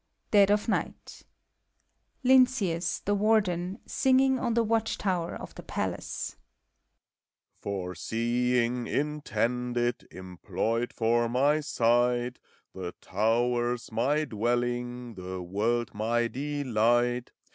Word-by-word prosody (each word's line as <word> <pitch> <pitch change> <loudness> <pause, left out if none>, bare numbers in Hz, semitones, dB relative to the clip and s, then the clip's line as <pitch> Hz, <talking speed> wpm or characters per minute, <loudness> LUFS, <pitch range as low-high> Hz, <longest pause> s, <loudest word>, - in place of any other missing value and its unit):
DEAD 200 -2 +6
OF 205 0 +2
NIGHT. 225 - -3 1.0
LTNCEUS, 245 -10 +3
THE 205 - +2
WARDER 195 -4 +1
(singing 265 0 +3
on 240 -2 -1
the 235 - +3
watch 225 0 0
tower 180 -4 -1
of - - -9
the - - -9
Palace). - - -4 1.2
FOR 95 -3 -4
seeing 120 +4 0
intended, 125 -4 -1
Employed 95 +6 -3
for 115 +1 +1
my 140 +5 +3
sight. 120 -2 +1 0.3
The 90 -2 -6
tower's 120 +4 0
my 140 +7 +1
dwelling, 120 +1 -2
The 95 -1 -6
world 110 +6 -1
my 115 +3 0
delight. 120 -3 0
120 Hz, 100 wpm, -28 LUFS, 115-165 Hz, 1.2 s, DEAD